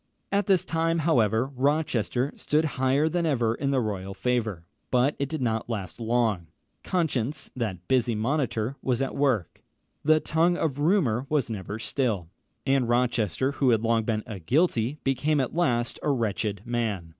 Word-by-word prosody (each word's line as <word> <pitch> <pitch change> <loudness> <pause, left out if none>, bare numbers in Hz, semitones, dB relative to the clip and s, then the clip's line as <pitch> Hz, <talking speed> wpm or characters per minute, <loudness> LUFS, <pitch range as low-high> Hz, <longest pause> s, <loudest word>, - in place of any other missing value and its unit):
At 200 +1 +1
this 190 -4 +3
time, 165 0 0
however, 120 -8 +2
Rochester 135 -2 0
stood 155 +2 +1 0.2
higher 135 +4 +3
than 170 +1 0
ever 120 -6 +1
in 140 +3 -2
the 135 -1 +2
royal 100 -4 -3
favour; 110 -9 -1 0.2
but 130 +3 +2
it 140 -1 -1
did 155 -5 -2
not 115 0 -1
last 100 -3 -4
long 115 -6 0 0.4
conscience, 145 -5 -1
that 95 -8 -4
busy 125 -3 +2
monitor, 120 0 -1
was 130 0 0
at 135 - -3
work. 130 - 0 0.4
The 155 +1 +5
tongue 165 +3 +2
of 145 -5 -1
rumour 145 - +2
was 145 -6 0
never 105 0 -5
still; 110 - -1 0.4
and 135 -3 +2
Rochester, 120 - +1
who 140 -2 +1
had 115 -2 +3
long 115 0 +2
been 110 -1 -1
a 105 -4 -7
guilty, 130 - +1
became 140 +3 +1
at 130 - -1
last 120 -7 0
a - - -1
wretched 105 -5 -1
man. 110 -8 -2
125 Hz, 165 wpm, -26 LUFS, 110-145 Hz, 0.4 s, The